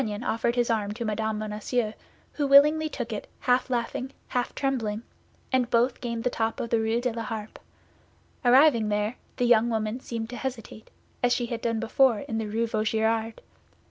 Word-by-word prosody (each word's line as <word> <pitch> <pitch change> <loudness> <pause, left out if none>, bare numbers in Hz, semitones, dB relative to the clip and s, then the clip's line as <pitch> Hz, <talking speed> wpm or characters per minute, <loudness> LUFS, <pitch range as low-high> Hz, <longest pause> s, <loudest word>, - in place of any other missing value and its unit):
D'Artagnan 215 -2 -3
offered 235 0 0
his 240 -1 +1
arm 210 -2 -1
to 235 0 -4
Mme. 220 0 -1
Bonacieux, 215 +2 -2 0.4
who 290 -2 -1
willingly 300 +3 +6
took 245 -6 -4
it, 210 - -5
half 250 +1 +2
laughing, 245 +1 -2 0.2
half 245 -1 -2
trembling, 235 -6 -1 0.5
and 250 -2 +2
both 240 +2 +2
gained 235 -2 -3
the 250 - +1
top 225 -1 -1
of 235 - -4
Rue 225 0 +2
de 250 0 -1
la 230 - -4
Harpe. 220 -1 -6 0.8
Arriving 245 -3 +5
there, 210 +3 -1 0.2
the 245 - +1
young 235 -1 +4
woman 220 +1 -1
seemed 230 -2 -5
to 245 - -6
hesitate, 240 -4 -6 0.3
as 245 0 +3
she 240 - -1
had 235 0 -4 0.2
before 235 +2 +3
done 210 - -6
in 225 - -2
the 220 - -3
Rue 225 +2 0
Vaugirard. 220 0 0
230 Hz, 180 wpm, -27 LUFS, 220-250 Hz, 0.8 s, willingly